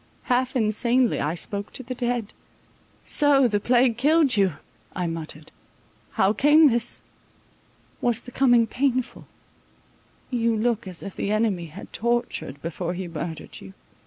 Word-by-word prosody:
Half 255 0 0
insanely 235 +2 +2
I 150 +4 -1
spoke 200 +3 -3
to 260 - -7
the 255 +1 -5
dead. 240 -3 -2 0.7
So 285 -3 +4
the 205 -3 0
plague 240 +1 +3
killed 295 0 +3
you, 195 -4 +2 0.4
I 180 - -2
muttered. 160 -2 -6 0.6
How 190 +2 +3
came 295 +4 +6
this? 235 -1 0 1.0
Was 240 -1 0
the 250 - -11
coming 245 -3 +4
painful? 255 +2 -2 1.0
You 230 -2 +1
look 230 -1 -1
as 180 -2 -7
if 200 - -7
the - - -3
enemy 210 -6 0
had 155 - -11
tortured, 235 - -2
before 170 +2 -4
he 185 0 -5
murdered 165 -1 -7
you. 95 0 -12
230 Hz, 140 wpm, -24 LUFS, 190-250 Hz, 1.0 s, came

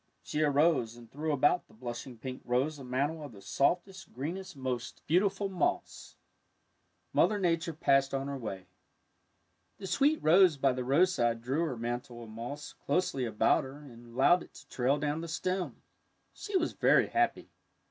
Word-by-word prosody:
She 150 - -2
arose 145 -5 +3
and 120 -1 -14
threw 155 +3 -2
about 145 +5 +2
the - - -21
blushing 120 +1 -7
pink 130 +2 -7
rose 135 +5 0
a - - -8
mantle 140 +5 -1
of 145 -5 -8
the 100 - -12
softest, 180 +6 0
greenest, 170 +6 -5
most 130 -2 -4
beautiful 195 +4 +2
moss. 190 -2 -2 1.0
Mother 215 - +3
Nature 170 -3 0
passed 135 -2 +2
on 135 0 -2
her 140 - -3
way. 100 -7 -6 1.1
The 195 - -8
sweet 280 - +3
rose 175 -1 +6
by 135 -1 +2
the 125 0 -3
roadside 125 -5 +2
drew 140 +7 0
her 130 -7 -3
mantle 120 +1 -4
of 110 - -11
moss 130 +7 -7
closely 140 -4 +1
about 110 -2 +2
her 135 +1 -9
and 120 -5 -13
allowed 175 +7 +5
it - - -14
to - - -14
trail 130 +3 +1
down 150 +2 -2
the 170 - -5
stem. 185 +3 -3 0.5
She 410 -2 -2
was 340 - -1
very - - +4
happy. 355 0 0
145 Hz, 170 wpm, -31 LUFS, 125-175 Hz, 1.1 s, rose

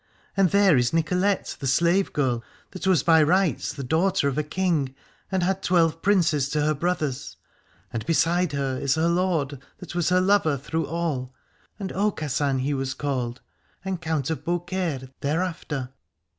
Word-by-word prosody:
And 195 -2 +4
there 200 -5 +5
is 120 +2 +1
Nicolette 180 +5 0
the 135 - -3
slave 170 +8 +2
girl, 125 -5 0 0.3
that 185 0 -5
was 180 -7 +4
by 160 -1 +5
rights 180 +3 +2
the 140 - -6
daughter 165 +4 +1
of 140 - -1
a 150 - +1
king, 150 -4 -1 0.4
and 190 -2 +1
had 190 +2 0
twelve 165 -2 +2
princes 160 -8 +2
to 150 +1 0
her 155 +1 +2
brothers. 150 -4 -2 0.6
And 115 -2 -2
beside 170 0 +2
her 135 -2 -1
is 135 -1 +1
her 160 +1 +2
lord, 170 -6 0 0.2
that 180 - -9
was 175 -1 +1
her 180 0 +4
lover 185 -6 +3
through 160 +4 -3
all, 145 -6 -3 0.4
and 195 -3 -5
Aucassin 150 -9 0
he 140 +3 0
was 135 -1 -2
called, 130 -4 -3 0.4
and 190 -2 -3
Count 160 -2 -1
of 160 - -4
Beaucaire 175 -6 -2
thereafter. 150 -4 -2
160 Hz, 165 wpm, -25 LUFS, 140-180 Hz, 0.6 s, there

